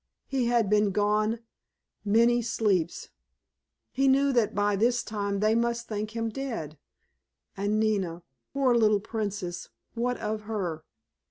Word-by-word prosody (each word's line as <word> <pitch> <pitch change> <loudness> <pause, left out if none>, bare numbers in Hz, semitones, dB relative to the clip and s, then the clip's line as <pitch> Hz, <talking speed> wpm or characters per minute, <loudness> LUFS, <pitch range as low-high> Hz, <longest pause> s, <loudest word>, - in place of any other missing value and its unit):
He 260 -3 0
had 235 -3 +2
been 210 0 +3
gone 210 +3 +1 0.6
"many 235 +3 +4
sleeps"! 200 -7 0 0.8
He 270 +1 +1
knew 275 +1 +4
that 235 -4 +1
by 205 0 +2
this 240 +4 +2
time 200 -2 -3
they 215 +1 +3
must 235 0 0
think 215 +1 -4
him 225 0 -1
dead. 215 - -5 0.8
And 205 +2 0
Nina—poor 205 - -1
little 215 -3 +4
Princess—what 215 +3 -4
of 215 0 -3
her? 175 -8 -3
215 Hz, 120 wpm, -27 LUFS, 205-235 Hz, 0.8 s, many